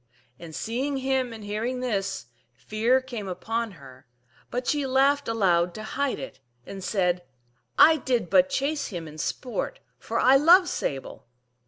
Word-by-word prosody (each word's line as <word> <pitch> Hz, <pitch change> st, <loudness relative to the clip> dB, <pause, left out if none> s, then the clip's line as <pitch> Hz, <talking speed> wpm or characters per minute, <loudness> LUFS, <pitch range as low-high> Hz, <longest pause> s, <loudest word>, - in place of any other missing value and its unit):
And 165 Hz, -2 st, -9 dB
seeing 265 Hz, +5 st, -2 dB
him 265 Hz, -2 st, 0 dB
and 220 Hz, -2 st, -9 dB
hearing 220 Hz, +5 st, -3 dB
this, 195 Hz, -, -2 dB, 0.3 s
fear 230 Hz, -, +1 dB
came 240 Hz, -6 st, -6 dB
upon 225 Hz, +4 st, -3 dB
her; 135 Hz, -4 st, -15 dB, 0.4 s
but 245 Hz, +1 st, -3 dB
she 290 Hz, 0 st, 0 dB
laughed 275 Hz, +2 st, +3 dB
aloud 180 Hz, -6 st, +2 dB
to 215 Hz, -, -6 dB
hide 275 Hz, +4 st, -2 dB
it, 270 Hz, -, -8 dB, 0.3 s
and 195 Hz, -1 st, -8 dB
said, 180 Hz, -2 st, +1 dB, 0.3 s
" -, -, -41 dB, 0.2 s
I 320 Hz, 0 st, +7 dB
did 255 Hz, -4 st, -1 dB
but 275 Hz, 0 st, +4 dB
chase 285 Hz, +2 st, -1 dB
him 170 Hz, -5 st, -6 dB
in 155 Hz, 0 st, -11 dB
sport, 260 Hz, -, -3 dB, 0.2 s
for -, -, -2 dB
I 265 Hz, +1 st, +6 dB
love 350 Hz, +6 st, +6 dB
Sable." 135 Hz, -4 st, -4 dB
235 Hz, 160 wpm, -26 LUFS, 190-270 Hz, 0.4 s, I